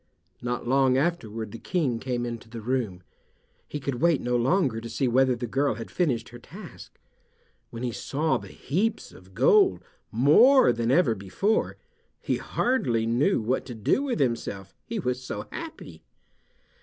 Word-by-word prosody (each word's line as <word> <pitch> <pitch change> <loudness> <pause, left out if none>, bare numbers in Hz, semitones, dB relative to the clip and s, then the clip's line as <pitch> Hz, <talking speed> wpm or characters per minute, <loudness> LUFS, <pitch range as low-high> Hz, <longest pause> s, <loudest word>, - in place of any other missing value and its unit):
Not 120 0 -3
long 130 0 +3
afterward 115 -9 -2
the 115 - -8
King 145 -11 -1
came 120 -1 -2
into 115 -1 -6
the 115 0 -7
room. 110 -6 -2 0.6
He 150 - -5
could 130 -3 -4
wait 170 -4 +4
no 125 0 -1
longer 125 -2 +1
to 115 - -7
see 120 +3 0
whether 130 +1 +3
the 120 +1 -4
girl 135 +2 0
had 115 +1 -8
finished 125 -11 0
her 120 - -11
task. - - -12 0.7
When 115 +1 -7
he 125 - -1
saw 150 +7 -1
the - - -11
heaps 210 - -2
of - - -17
gold, 425 -5 +4 0.3
more 155 - +6
than 115 0 -1
ever 135 -3 +4
before, 110 - -1 0.4
he - - -1
hardly 125 - 0
knew 120 - +2
what 125 +4 0
to 120 - -7
do 110 - +1
with 270 - -2
himself, 115 -7 -2
he 230 - -3
was 125 -8 -2
so 105 -4 -5
happy. 325 -1 -8
125 Hz, 165 wpm, -26 LUFS, 115-165 Hz, 0.7 s, more